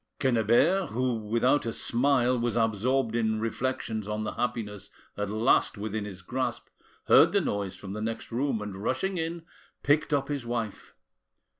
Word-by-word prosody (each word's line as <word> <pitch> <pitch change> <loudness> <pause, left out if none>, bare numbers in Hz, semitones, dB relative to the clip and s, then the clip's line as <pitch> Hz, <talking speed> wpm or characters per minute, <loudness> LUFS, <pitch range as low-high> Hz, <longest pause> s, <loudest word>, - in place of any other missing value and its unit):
Quennebert, 130 - +3
who, 125 +2 0
without 120 +4 +2
a - - 0
smile, 125 +1 +2
was 120 -2 -1
absorbed 115 +2 +1
in 110 -2 +1
reflections 115 -2 -2
on 105 0 -2
the - - -2
happiness 115 -4 -3 0.3
at 105 -1 -3
last 110 +1 +2
within 105 0 -3
his 95 -3 -9
grasp, 130 +7 -3 0.4
heard - - +6
the - - +4
noise 100 -2 -2
from 95 -1 -8
the 105 - -5
next 115 +2 -4
room, 120 -2 -1
and 100 -2 -6
rushing 190 - -1
in, 165 +1 -3 0.4
picked 150 +2 +2
up 140 -2 +1
his 145 -3 -3
wife. 115 -3 -4
115 Hz, 160 wpm, -28 LUFS, 105-130 Hz, 0.4 s, heard